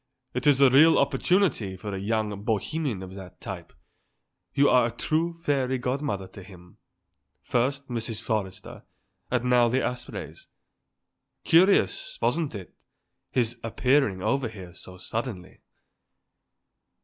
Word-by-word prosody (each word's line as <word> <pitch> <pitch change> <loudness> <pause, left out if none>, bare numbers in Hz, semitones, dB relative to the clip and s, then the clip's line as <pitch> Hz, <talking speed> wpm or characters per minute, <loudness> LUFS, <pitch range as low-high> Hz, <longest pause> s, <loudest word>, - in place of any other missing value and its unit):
"It 125 +4 -1
is 140 -2 +5
a 135 -2 +6
real 155 +5 +7
opportunity 140 - +1
for 100 +2 -6
a 95 - -3
young 105 0 -2
bohemian 110 +1 -2
of 95 0 -9
that 95 -2 -11
type; - - -7 0.8
you 140 +1 +3
are 125 -2 +5
a - - -4
true 155 +8 0
fairy 140 -6 -1
godmother 125 -6 -2
to 95 - -11
him; 90 -2 -15 0.7
first 140 +3 0
Mrs. 115 -2 -3
Forrester 105 -4 -4 0.5
and 125 -1 0
now 125 -1 +4
the 130 +3 +1
Aspreys. 125 0 -6 1.0
Curious, 200 - +3
wasn't 160 -7 0
it, 95 -3 -9 0.6
his 120 -1 -1
appearing 115 -4 +1
over 130 +3 +1
here 95 -5 -10
so 90 0 -11
suddenly?" 110 -1 -6
120 Hz, 125 wpm, -26 LUFS, 100-140 Hz, 1.0 s, real